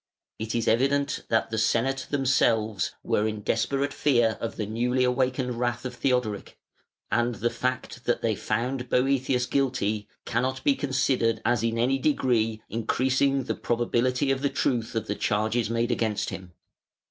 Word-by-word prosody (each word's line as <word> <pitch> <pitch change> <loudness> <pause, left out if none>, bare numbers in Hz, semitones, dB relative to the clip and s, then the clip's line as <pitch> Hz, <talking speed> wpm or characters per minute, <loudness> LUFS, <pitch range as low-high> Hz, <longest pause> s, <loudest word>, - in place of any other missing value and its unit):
It 110 +1 -3
is 115 - 0
evident 140 +5 +1
that 115 0 +1
the 110 - -1
Senate 130 +5 +1
themselves 115 -7 +1
were 105 - +1
in 105 -1 -4
desperate 140 +7 0
fear 120 -6 +2
of 115 - -3
the 105 - -3
newly 120 +4 0
awakened 125 -1 0
wrath 120 0 -1
of 125 - -4
Theodoric, 125 -5 -1 0.5
and 120 0 +1
the 115 +3 -1
fact 130 0 -3
that 120 - 0
they 115 -1 +2
found 125 +6 -2
Boëthius 130 -1 +1
guilty 120 -6 0 0.2
cannot 130 +3 -1
be 285 - +4
considered 130 - +1
as 120 -3 +2
in 115 0 0
any 130 +3 +2
degree 115 -6 +1
increasing 130 +4 +1
the - - -2
probability 125 +3 0
of 135 0 -1
the 140 - +1
truth 120 -4 -1
of 110 -1 -1
the 105 - -2
charges 110 +2 0
made 115 +1 0
against 110 -3 -1
him. 90 -2 -8
120 Hz, 160 wpm, -26 LUFS, 110-130 Hz, 0.5 s, be